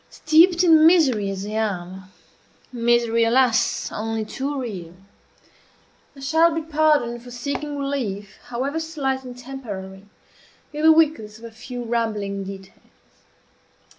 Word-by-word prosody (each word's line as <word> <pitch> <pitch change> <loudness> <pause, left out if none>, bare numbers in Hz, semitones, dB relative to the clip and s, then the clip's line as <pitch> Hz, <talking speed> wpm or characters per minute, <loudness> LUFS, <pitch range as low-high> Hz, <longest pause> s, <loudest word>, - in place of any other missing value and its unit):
Steeped 340 +3 +4
in 320 -2 +7
misery 265 - +3
as 195 0 -5
I - - -6
am 190 -4 -3 0.7
misery, 235 -1 +2
alas! 240 0 +2
only 220 0 -3
too 275 +5 -4
real 185 -9 -6 1.2
I 275 - -13
shall 320 +4 +3
be 325 - -2
pardoned 300 -6 +1
for 245 - -12
seeking 285 +4 -4
relief, 235 -8 -4
however 260 +6 -3
slight 280 -5 -3
and 250 -1 -9
temporary, 205 -7 -8 0.7
in 300 - -4
the 320 +1 +7
weakness 300 -10 +2
of 225 - -17
a 230 - -9
few 245 +2 -8
rambling 215 -4 -2
details. 195 0 -9
245 Hz, 130 wpm, -22 LUFS, 215-290 Hz, 1.2 s, in